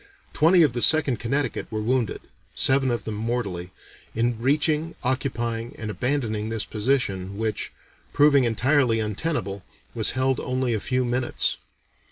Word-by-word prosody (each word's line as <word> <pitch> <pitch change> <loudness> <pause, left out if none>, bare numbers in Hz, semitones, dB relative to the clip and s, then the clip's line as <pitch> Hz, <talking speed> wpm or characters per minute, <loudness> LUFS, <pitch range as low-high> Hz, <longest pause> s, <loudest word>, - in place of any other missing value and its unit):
Twenty 170 +2 +5
of 145 - +2
the 120 - -2
Second 145 -7 +3
Connecticut 130 0 -2
were 110 - -2
wounded 120 0 0 0.3
seven 135 0 +3
of 120 -1 -1
them 110 - -4
mortally 105 -5 -3 0.5
in 115 0 0
reaching, 150 +4 +1
occupying, 120 -3 -2
and 110 -1 -4
abandoning 110 -4 -1
this 115 -1 -2
position, 105 -5 -1
which, 110 -1 -2 0.4
proving 145 -2 +5
entirely 120 +1 +2
untenable, 105 - -2 0.3
was 110 - 0
held 130 0 +1
only 130 -1 -1
a 110 - 0
few 130 +3 0
minutes. 120 0 -1
120 Hz, 140 wpm, -24 LUFS, 110-135 Hz, 0.5 s, Twenty